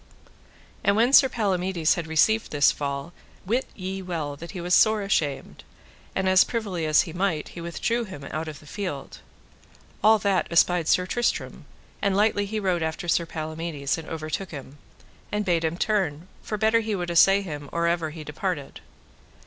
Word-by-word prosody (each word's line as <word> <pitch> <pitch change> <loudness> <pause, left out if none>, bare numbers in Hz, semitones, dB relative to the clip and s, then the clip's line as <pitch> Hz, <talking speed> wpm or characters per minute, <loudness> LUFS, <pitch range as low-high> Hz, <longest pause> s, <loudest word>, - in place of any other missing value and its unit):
And 200 - +3
when 235 +5 +3
Sir 265 -1 +8
Palamides 185 -7 +1
had 170 -2 -4
received 215 +8 +2
this 145 -1 +4
fall, 140 +3 -4 0.3
wit 240 +7 0
ye 190 0 -5
well 165 -6 -4
that 170 +4 -10
he 190 - -7
was 175 +1 -1
sore 215 +1 +5
ashamed, 150 -8 -2 0.5
and 190 0 0
as 185 0 +6
privily 200 -9 -3
as 155 0 +5
he 160 - -8
might 175 -4 -1
he 170 - -9
withdrew 230 +8 -1
him 165 -9 -9
out 160 +1 -3
of 150 -2 -7
the - - -17
field. 165 -5 -6 0.8
All 220 +1 +7
that 200 -3 +1
espied 170 0 +3
Sir 180 - +3
Tristram, 240 +5 -2 0.4
and 200 -1 +1
lightly 205 -1 +2
he 215 +2 -2
rode 185 -4 0
after 160 +3 -3
Sir 170 0 +1
Palamides 155 -3 -3
and 165 -1 -8
overtook 160 +4 -4
him, 140 -1 -10 0.5
and 210 0 -1
bade 170 -3 +1
him 160 +1 -1
turn, 180 -6 -1
for 215 - -4
better 220 +2 +3
he 220 -2 -2
would 175 -2 -3
assay 195 +4 +5
him 145 -6 -7
or 170 0 0
ever 170 -1 0
he 155 0 -8
departed. 150 -1 -4
175 Hz, 180 wpm, -25 LUFS, 155-200 Hz, 0.8 s, Sir